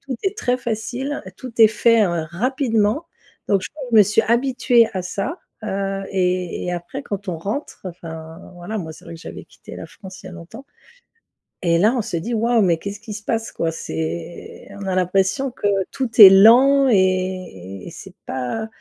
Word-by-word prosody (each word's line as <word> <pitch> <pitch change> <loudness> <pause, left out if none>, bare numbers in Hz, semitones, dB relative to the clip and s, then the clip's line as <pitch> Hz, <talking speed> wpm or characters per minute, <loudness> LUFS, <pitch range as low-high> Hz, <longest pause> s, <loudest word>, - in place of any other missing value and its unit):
Tout 265 -3 -6
est 390 +1 -1
très 250 -12 0
facile, 245 +4 -4
tout 255 -2 -9
est 220 - +9
fait 225 0 +3
r 170 -3 -2
rapidement. 235 - 0 0.4
Donc 195 -2 +2
je - - -5 0.3
me 210 - +9
suis 205 +2 +2
habituée 240 -1 +3
à 185 -2 -3
ça, 195 - -4 0.2
heu, 195 -1 -3
et 180 -2 -1
et 180 - -2
après 175 +11 -6
quand 200 -5 -6
on 170 - -2
rentre 210 - -5
enfin, 165 -1 -9
voilà, 175 +5 -6
moi 160 -3 -6
c'est - - -16
vrai 170 - -9
que 165 - -12
j'avais - - -9
quitté - - -13
la - - -8
France 190 -2 -12
il - - -11
y - - -7
a - - -10
longtemps, 180 +10 -11 1.0
et 170 0 +3
là, 215 +7 +3
on - - +1
se 210 -6 -4
dit: 230 +9 -4
«Waouh, 230 0 +2
mais 175 -4 +3
qu'est-ce 200 +4 -7
qui 220 -1 -8
se 205 0 -8
passe 225 0 -2
quoi?» 165 -1 -1
C'est 80 - -6
on - - -5
a 190 - -1
l'impression 190 +9 +1
que 220 -4 -3 0.2
tout 260 -3 -3
est 205 - +14
lent 255 +8 +6
et 185 - -1
et - - -6
c'est - - -12
pas 130 - -4
200 Hz, 195 wpm, -21 LUFS, 175-235 Hz, 1.0 s, est